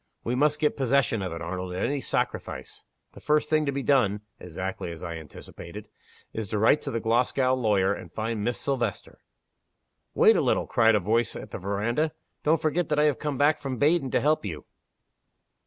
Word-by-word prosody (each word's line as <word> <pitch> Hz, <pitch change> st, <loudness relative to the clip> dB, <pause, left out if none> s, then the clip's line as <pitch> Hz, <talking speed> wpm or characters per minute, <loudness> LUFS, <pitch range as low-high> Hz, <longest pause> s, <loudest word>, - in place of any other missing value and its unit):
We 120 Hz, -, -1 dB
must 150 Hz, +3 st, +2 dB
get 150 Hz, -1 st, +1 dB
possession 130 Hz, -4 st, +1 dB
of 95 Hz, -2 st, -3 dB
it, 85 Hz, 0 st, -5 dB
Arnold, 90 Hz, +1 st, -4 dB
at 90 Hz, -, -1 dB
any 140 Hz, -1 st, -1 dB
sacrifice. -, -, -3 dB, 0.3 s
The -, -, -12 dB
first 150 Hz, 0 st, +1 dB
thing 155 Hz, -1 st, +2 dB
to -, -, +2 dB
be 140 Hz, 0 st, -3 dB
done 110 Hz, -8 st, +2 dB, 0.2 s
(exactly 90 Hz, 0 st, -5 dB
as 85 Hz, +1 st, -9 dB
I 85 Hz, -2 st, -4 dB
anticipated), 85 Hz, +5 st, -10 dB, 0.4 s
is 110 Hz, -2 st, -4 dB
to 110 Hz, -, -1 dB
write 110 Hz, +8 st, +4 dB
to -, -, -4 dB
the 115 Hz, -, -2 dB
Glasgow 125 Hz, +3 st, +2 dB
lawyer, 105 Hz, -6 st, +2 dB
and 85 Hz, -4 st, -9 dB
find 110 Hz, +1 st, -3 dB
Miss 120 Hz, +2 st, -1 dB
Silvester." 120 Hz, -8 st, -3 dB, 1.0 s
"Wait -, -, +6 dB
a -, -, +3 dB
little!" -, -, +1 dB
cried 115 Hz, -2 st, +4 dB
a -, -, +3 dB
voice 110 Hz, +5 st, +1 dB
at -, -, -8 dB
the -, -, -5 dB
veranda. 110 Hz, -, -1 dB, 0.3 s
"Don't 155 Hz, +1 st, +2 dB
forget 160 Hz, +1 st, 0 dB
that 150 Hz, -, +1 dB
I 150 Hz, -, +4 dB
have 150 Hz, -2 st, +2 dB
come 150 Hz, -3 st, -3 dB
back 145 Hz, +3 st, +3 dB
from 135 Hz, -3 st, -4 dB
Baden 150 Hz, +1 st, +2 dB
to -, -, +2 dB
help 150 Hz, +4 st, +2 dB
you!" 85 Hz, -7 st, -6 dB
120 Hz, 200 wpm, -26 LUFS, 100-145 Hz, 1.0 s, Wait